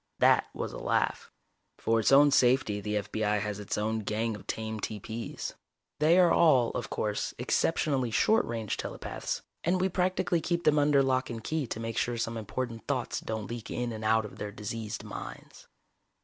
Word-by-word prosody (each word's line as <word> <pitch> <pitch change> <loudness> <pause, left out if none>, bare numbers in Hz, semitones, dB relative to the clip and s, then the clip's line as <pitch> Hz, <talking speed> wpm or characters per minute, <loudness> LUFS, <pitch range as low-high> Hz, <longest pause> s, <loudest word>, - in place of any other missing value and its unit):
That - - +4
was - - -4
a - - -6
laugh. - - 0 0.5
For 115 0 +1
its 110 - +2
own 145 +1 +7
safety 120 -6 +3
the 105 +1 -1
F.B.I. 105 0 0
has 105 0 -3
its 105 - -3
own 110 +1 0
gang 110 +1 -1
of 105 - -12
tame 110 0 -3
TP's 110 +2 -5 0.5
they 160 +4 +5
are 180 -2 +6
all, 135 -8 +5
of 120 - -4
course, 105 -1 -2
exceptionally 130 0 +1
short 220 - +3
range 115 -3 -3
telepaths, - - -4 0.2
and 180 +2 +2
we 190 +1 +2
practically 180 -1 +1
keep 170 0 -1
them 150 -2 +4
under 145 -1 +4
lock 130 -1 +1
and 115 -2 -6
key 155 -1 -1
to 110 - -4
make 115 0 -2
sure 120 -1 -1
some 115 0 -2
important 115 +1 -4
thoughts - - -1
don't 110 -2 -4
leak 120 0 -6
in 120 -1 -2
and 110 -1 -6
out 110 0 +3
of 105 - -10
their 105 0 -4
diseased 105 +1 -5
minds. 105 - -9
115 Hz, 185 wpm, -29 LUFS, 110-140 Hz, 0.5 s, own